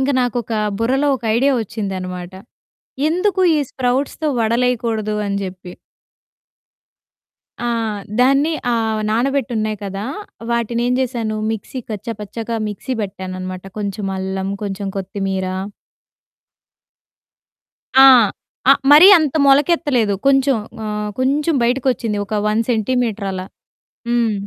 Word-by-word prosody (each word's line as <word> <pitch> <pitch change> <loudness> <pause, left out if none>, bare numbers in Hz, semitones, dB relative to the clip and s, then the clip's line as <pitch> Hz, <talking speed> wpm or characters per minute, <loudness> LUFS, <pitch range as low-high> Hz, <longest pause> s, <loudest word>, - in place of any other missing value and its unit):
ఇంక 265 +2 +1
నాకొక 240 -2 -2 0.3
బుర్రలో 265 +5 +1
ఒక 240 - -14
ఐడియా 275 +4 +3
ఒచ్చిందనమాట. 185 -4 -5 0.8
ఎందుకు 375 +4 0 0.2
ఈ - - +2
స్ప్రౌట్స్‌తో 265 +5 -1
వడలేయకూడదు 230 -2 0
అని 200 0 -1
జేప్పి. 185 -1 -7 1.9
ఆ! 240 - -2 0.5
దాన్ని 275 +5 +3 0.2
ఆహ్, 220 -2 0
నానబెట్టున్నాయి 235 -3 0
కదా! 195 +1 -5 0.5
వాటినేం 235 +1 0
చేశాను 235 -4 -2
మిక్సీ 225 +4 -5
కచ్చ 210 -1 -6
పచ్చగా 225 +3 -5
మిక్సీ 250 +5 -4
పెట్టాననమాట 185 -1 -6
కొంచెం 200 -1 -3
అల్లం 190 0 -3 0.2
కొంచెం 200 0 -4
కొత్తిమీర 195 0 -3 2.5
ఆ! - - +10 0.7
ఆ - - +11 0.2
మరీ 300 +5 +9
అంత 305 -4 -1
మొలకెత్తలేదు. 275 -6 +3
కొంచెం 270 -1 +4 0.3
ఆహ్, 210 0 -3
కొంచెం 285 +5 +1
బయటికొచ్చింది 245 -3 0
ఒక 210 - -5
1 215 +1 +1
సెంటీమీటర్ 225 -2 0
అలా. 185 0 -5 0.6
హ్మ్. 235 -2 +2
230 Hz, 105 wpm, -19 LUFS, 200-260 Hz, 2.5 s, ఆ